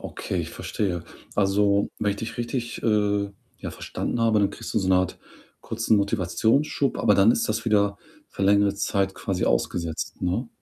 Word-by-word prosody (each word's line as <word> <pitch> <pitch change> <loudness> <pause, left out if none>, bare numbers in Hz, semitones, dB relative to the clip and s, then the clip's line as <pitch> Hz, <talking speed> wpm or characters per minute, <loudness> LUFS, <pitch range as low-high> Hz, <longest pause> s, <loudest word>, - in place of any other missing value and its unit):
Okay, - - -5
ich - - -5
verstehe. 90 -5 -3 0.3
Also, 100 0 +2
wenn 105 - +1
ich 100 - -3
dich 115 +4 -6
richtig, 120 0 -3
äh, 105 -2 +1 0.3
ja, - - -5
verstanden 120 - -4
habe, 110 -2 +3
dann 100 - +2
kriegst - - -8
du - - +4
so 95 -2 -1
'ne 95 - +5
Art 90 -1 0 0.4
kurzen 115 -1 +1
Motivationsschub, 110 - +1
aber 105 - +4
dann 100 +3 +6
ist 115 - +1
das 110 - -1
wieder 100 -3 +2 0.3
für - - -6
längere 100 0 +4
Zeit 100 -1 0
quasi 95 -2 -2
ausgesetzt, 80 +7 -1
ne? 90 +8 -1
100 Hz, 175 wpm, -25 LUFS, 95-110 Hz, 0.4 s, dann